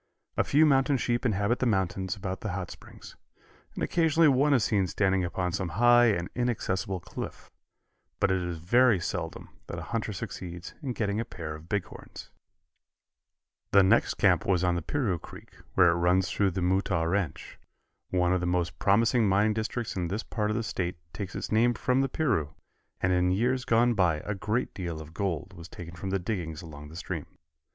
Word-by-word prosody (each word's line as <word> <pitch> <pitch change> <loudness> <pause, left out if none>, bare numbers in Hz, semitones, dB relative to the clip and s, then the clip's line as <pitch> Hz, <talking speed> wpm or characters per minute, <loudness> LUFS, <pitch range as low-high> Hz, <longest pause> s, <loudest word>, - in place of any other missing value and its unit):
A - - +2
few 150 +3 +4
mountain 135 -1 +3
sheep 120 0 0
inhabit 105 +2 +1
the 130 - +1
mountains 95 -1 0
about 95 -2 -5
the 105 -5 -3
Hot 90 -2 -4
Springs, - - -13 0.6
and - - -3
occasionally 165 -1 +3
one 140 +2 +3
is 130 -6 +4
seen 100 -4 +1
standing 95 +1 +1
upon 90 +1 -2
some 95 0 -2
high 120 +1 +6
and 90 -6 +1
inaccessible 100 -6 -1
cliff, 80 - -8 0.7
but 100 - +2
it 95 -1 +1
is 90 -1 -3
very 115 +6 +4
seldom - - -4 0.2
that - - -6
a - - -5
hunter 115 -2 -3
succeeds 90 -2 -7
in 130 -4 -3
getting 105 -2 -1
a - - 0
pair 85 -7 -7
of 80 +2 -11
big 100 -3 0
horns. - - -12 1.4
The 100 0 +7
next 105 +5 +3
camp 95 -4 +3
was 95 -2 +1
on 90 -1 +3
the 85 - -1
Piru 95 - -1
Creek, - - -13 0.2
where 85 -2 +6
it 85 0 -1
runs 90 +2 +2
through 100 -2 +2
the 95 0 -3
Mutaw 90 -2 +1
ranch. 90 -4 -2 0.5
One 90 -1 +2
of 95 - +2
the 90 - -2
most 90 -1 -1
promising 115 +2 +3
mining 105 +3 +3
districts 110 +2 -3
in 90 -2 -1
this 105 +6 -3
part 105 -2 -2
of 105 - 0
the 115 - -1
State 90 -5 -3 0.2
takes 100 -3 -6
its - - -4
name 115 +2 +3
from 125 +3 +1
the 135 - 0
Piru, 115 - 0 0.5
and 90 0 +2
in 90 0 +2
years 125 +7 +1
gone 120 +1 +3
by 90 -6 +3
a 105 - -3
great 110 +5 -2
deal 85 -4 -4
of 80 0 -10
gold 95 -1 -3
was 85 -1 -11
taken 85 -1 -9
from 85 +3 -6
the 95 - +1
diggings 90 -4 -4
along 75 -2 -10
the 80 - -12
stream. 85 - -5
95 Hz, 195 wpm, -28 LUFS, 90-115 Hz, 1.4 s, The